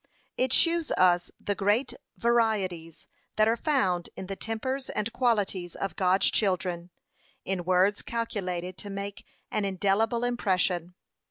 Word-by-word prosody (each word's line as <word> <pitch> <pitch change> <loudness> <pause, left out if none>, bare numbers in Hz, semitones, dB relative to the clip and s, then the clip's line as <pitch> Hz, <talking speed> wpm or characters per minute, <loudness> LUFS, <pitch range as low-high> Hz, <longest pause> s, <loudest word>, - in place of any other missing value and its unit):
It 255 -1 0
shews 335 -2 +3
us 175 -1 +3
the 205 - -1
great 210 +6 +1 0.2
varieties 205 -9 0 0.3
that 215 0 +4
are 225 - +3
found 195 - 0
in - - -6
the 195 +1 -5
tempers 260 +6 -3
and 215 +2 -2
qualities 205 -8 0
of 195 -4 -4
God's 185 +1 +3
children, 180 -3 0 0.6
in 185 -2 -2
words 185 +3 +3
calculated 185 -6 -3
to 205 - -7
make 200 0 -6 0.2
an 215 - 0
indelible 200 +5 +1
impression. 185 -7 0
200 Hz, 135 wpm, -28 LUFS, 180-230 Hz, 0.6 s, that